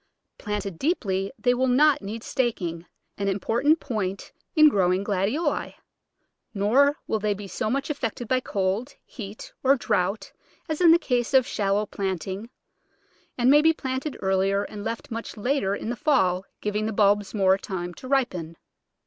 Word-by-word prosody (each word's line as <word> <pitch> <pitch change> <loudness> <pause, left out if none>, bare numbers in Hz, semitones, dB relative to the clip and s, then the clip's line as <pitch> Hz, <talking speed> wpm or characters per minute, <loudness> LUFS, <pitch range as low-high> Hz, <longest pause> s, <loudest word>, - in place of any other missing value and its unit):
Planted 205 -4 -4
deeply 195 - 0
they 245 -1 +2
will 260 +1 +1
not 285 +3 +4
need 215 +3 -6
staking 180 -10 -2
— - - -50
an 200 - -1
important 235 - +2
point 200 -7 -4 0.2
in 310 -1 +8
growing 190 -6 +2
Glad 200 -1 0
ioli; 295 +4 -2 0.8
nor 265 +9 +3
will 220 - -1
they 210 -1 0
be 200 0 -8
so 190 +3 -3
much 275 +5 -1
affected 240 -4 -4
by 255 +2 +2
cold, 205 +3 -2
heat, 210 -3 -9
or 270 +1 +5
draught 205 -4 -1 0.3
as 315 +1 -3
in 345 - +7
the 330 - +8
case 250 -6 -1
of 260 -2 +6
shallow 205 -1 0
planting, 195 +2 -4 0.9
and 250 +1 +4
may 295 +1 +7
be 320 +1 +5
planted 265 0 -4
earlier 195 +1 +2
and 205 0 -7
left 225 +1 -5
much 230 0 -6
later 210 -3 0
in 220 - -4
the - - -2
fall, 195 - +2 0.2
giv 210 0 -2
ing 215 +1 0
the 220 - -2
bulbs 205 0 +2
more 190 -2 +4
time 175 -3 -5
to 255 - -11
ripen. 185 - -1
215 Hz, 170 wpm, -25 LUFS, 195-260 Hz, 0.9 s, in